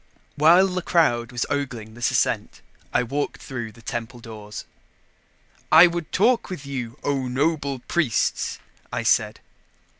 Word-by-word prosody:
While 170 Hz, +6 st, +6 dB
the 185 Hz, -1 st, -2 dB
crowd 120 Hz, -10 st, +2 dB
was 120 Hz, -1 st, -1 dB
ogling 125 Hz, -6 st, -3 dB
this 120 Hz, +1 st, 0 dB
ascent, -, -, -1 dB, 0.3 s
I -, -, +2 dB
walked 140 Hz, +4 st, -3 dB
through 120 Hz, -4 st, -6 dB
the 115 Hz, +1 st, -18 dB
temple 120 Hz, +2 st, -5 dB
doors. 105 Hz, -2 st, -9 dB, 1.1 s
"I 160 Hz, +3 st, +10 dB
would 170 Hz, -2 st, -2 dB
talk 230 Hz, +5 st, +2 dB
with 180 Hz, -7 st, -6 dB
you, 130 Hz, -3 st, -5 dB
O 135 Hz, -2 st, -1 dB
noble 140 Hz, +1 st, 0 dB
priests," 155 Hz, -10 st, 0 dB, 0.3 s
I -, -, -2 dB
said. -, -, +2 dB
135 Hz, 140 wpm, -23 LUFS, 120-165 Hz, 1.1 s, I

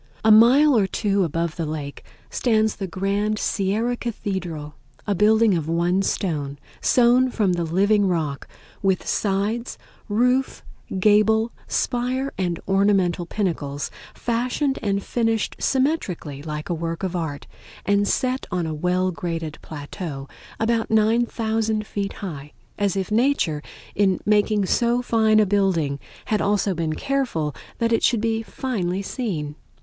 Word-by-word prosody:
A 220 Hz, -, +7 dB
mile 255 Hz, +7 st, +7 dB
or 205 Hz, -4 st, +3 dB
two 200 Hz, 0 st, +1 dB
above 165 Hz, 0 st, -2 dB
the 165 Hz, -, -1 dB
lake 150 Hz, -2 st, -5 dB, 0.3 s
stands 220 Hz, -3 st, +1 dB
the 195 Hz, -, -3 dB
grand 200 Hz, +4 st, -1 dB
Sierra 215 Hz, +5 st, 0 dB
Cathedral, 185 Hz, -10 st, -4 dB, 0.3 s
a 205 Hz, -, +1 dB
building 215 Hz, +2 st, +4 dB
of 160 Hz, -3 st, -1 dB
one 175 Hz, +3 st, +2 dB
stone, 150 Hz, -8 st, -2 dB, 0.2 s
sewn 250 Hz, +1 st, +4 dB
from 205 Hz, -7 st, +1 dB
the 175 Hz, -1 st, -1 dB
living 200 Hz, +5 st, +2 dB
rock, 155 Hz, -6 st, -2 dB, 0.3 s
with 190 Hz, -2 st, +1 dB
sides, 210 Hz, +4 st, -1 dB, 0.3 s
roof, 250 Hz, +5 st, +1 dB, 0.4 s
gable, 215 Hz, +3 st, +4 dB, 0.2 s
spire 255 Hz, +3 st, -1 dB
and 175 Hz, -3 st, -2 dB
ornamental 195 Hz, -3 st, +2 dB
pinnacles, 160 Hz, -8 st, -2 dB, 0.2 s
fashioned 250 Hz, +4 st, -1 dB
and 200 Hz, -1 st, -1 dB
finished 225 Hz, -2 st, 0 dB
symmetrically 260 Hz, -, -1 dB
like 150 Hz, 0 st, -5 dB
a -, -, -1 dB
work 165 Hz, +1 st, -4 dB
of 185 Hz, -1 st, -2 dB
art, 160 Hz, -5 st, -3 dB, 0.4 s
and 200 Hz, 0 st, +2 dB
set 255 Hz, 0 st, 0 dB
on 180 Hz, -1 st, -1 dB
a 160 Hz, -, -3 dB
well 180 Hz, +4 st, 0 dB
graded 165 Hz, -3 st, -4 dB
plateau 145 Hz, -1 st, -7 dB, 0.3 s
about 225 Hz, 0 st, +1 dB
9000 220 Hz, -1 st, +1 dB
feet 200 Hz, -2 st, -3 dB
high, 150 Hz, -7 st, -7 dB, 0.2 s
as 200 Hz, -2 st, 0 dB
if 190 Hz, +2 st, -2 dB
Nature 215 Hz, -, +2 dB, 0.3 s
in 190 Hz, -3 st, +2 dB
making 210 Hz, -1 st, +3 dB
so 240 Hz, +5 st, +1 dB
fine 220 Hz, -2 st, +3 dB
a 215 Hz, -, +5 dB
building 185 Hz, -8 st, +1 dB, 0.3 s
had 215 Hz, -, 0 dB
also 200 Hz, -1 st, +1 dB
been 165 Hz, -2 st, -2 dB
careful 235 Hz, -, -1 dB, 0.2 s
that 230 Hz, -1 st, +1 dB
it 230 Hz, -, +2 dB
should 235 Hz, -, +3 dB
be 225 Hz, 0 st, 0 dB
finely 200 Hz, -6 st, -3 dB
seen. 175 Hz, -, -3 dB
200 Hz, 140 wpm, -23 LUFS, 170-225 Hz, 0.4 s, A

